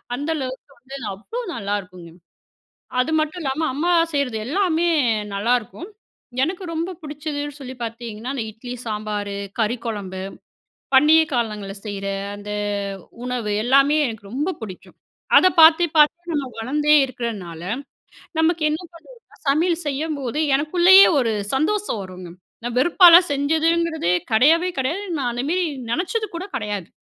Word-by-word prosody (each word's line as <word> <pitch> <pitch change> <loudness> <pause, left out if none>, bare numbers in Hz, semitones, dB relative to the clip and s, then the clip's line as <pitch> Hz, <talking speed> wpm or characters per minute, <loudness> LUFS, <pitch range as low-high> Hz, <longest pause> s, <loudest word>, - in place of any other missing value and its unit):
அந்த 290 +5 -4
அளவுக்கு 265 0 -6
வந்து 265 +3 -9 0.2
அவ்ளோ 455 - -6
நல்லாயிருக்குங்க. 185 -4 -5 0.9
அது 255 - 0
மட்டும் 310 +3 -3
இல்லாம 275 +2 -2
அம்மா 340 +6 +1 0.2
செய்றது 255 -6 0
எல்லாமே 345 +1 +1 0.5
நல்லாருக்கும். 240 - -1 0.6
எனக்கு 365 +4 -4
ரொம்ப 330 +3 -2
பிடிச்சதுன்னு 290 -1 -5
சொல்லி 260 -1 -7
பார்த்தீங்கன்னா, 230 +1 -6
அந்த 245 -5 -3
இட்லி, 245 +3 -8
சாம்பாரு, 210 -2 -3 0.2
கறி 225 +2 +1
குழம்பு, 195 -4 -5 0.7
பண்டிகை 310 +4 +6
காலங்கள்ல 210 -5 -2
செய்ற 200 -2 -5 0.3
அந்த 205 0 -8 0.7
உணவு, 245 -4 -2
எல்லாமே 275 +4 +4
எனக்கு 220 -4 -8
ரொம்ப 295 +7 -1
பிடிக்கும். 190 -4 -10 0.4
அத 370 - +7
பார்த்து 320 +2 +7
பார்த்து 340 +4 +3
நம்ம 290 -3 -1
வளர்ந்தே 295 +6 +2
இருக்குறனால, 210 -10 -6 0.8
நமக்கு 325 0 +2
என்ன 305 - -1
பண்றதுனா 345 +10 -16 0.3
சமையல் 330 +4 +2
செய்யும்போது 290 -2 -3 0.2
எனக்குள்ளேயே 350 +7 +6
ஒரு 235 -4 +1 0.2
சந்தோஷம் 320 - 0
வருங்க. 185 -2 -9 0.3
நான் 240 0 -4
வெறுப்பாலாம் 345 +4 +7
செஞ்சதுங்கிறதே 320 - +1 0.2
கிடையவே 320 +11 +4
கிடையாது. 310 +10 -1
நான் 250 -3 -1
அந்தமேரி 300 +10 -1 0.3
நினச்சது 390 - -1
கூட 345 - -5
கிடையாது. 210 -7 -3
275 Hz, 125 wpm, -22 LUFS, 225-320 Hz, 0.9 s, அத